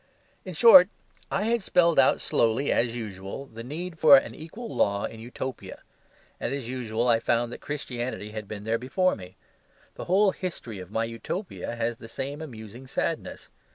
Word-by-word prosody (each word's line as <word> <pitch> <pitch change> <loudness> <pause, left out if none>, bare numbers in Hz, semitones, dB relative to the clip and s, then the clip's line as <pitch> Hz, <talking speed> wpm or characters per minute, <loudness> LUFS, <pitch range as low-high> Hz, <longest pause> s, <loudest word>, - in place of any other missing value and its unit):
In 185 -3 -7
short, 190 -1 +9 0.4
I 195 - 0
had 230 +1 +1
spelled 170 -5 +3
out 130 - +5
slowly, 115 +5 +1
as 120 0 +1
usual, 105 +2 -6
the 115 -3 -10
need 165 +6 -6
for 145 -3 +9
an - - -1
equal 210 +10 -8
law 100 0 +1
in 110 - -7
Utopia; 125 +3 -7 0.6
and, - - -2
as 135 -5 -5
usual, 120 -2 -2
I 115 -2 +4
found 120 +1 0
that - - -8
Christianity 125 -6 -4
had 105 -1 -6
been 105 -1 -7
there 115 +1 0
before 185 +9 +1
me. 90 -2 -12 0.6
The - - -7
whole 195 +2 +4
history 145 - -6
of 90 -1 -9
my 110 +2 -1
Utopia 115 - -5
has 115 0 -2
the 115 - -10
same 140 +5 -5
amusing 120 -3 -9
sadness. - - -3
125 Hz, 175 wpm, -27 LUFS, 115-160 Hz, 0.6 s, short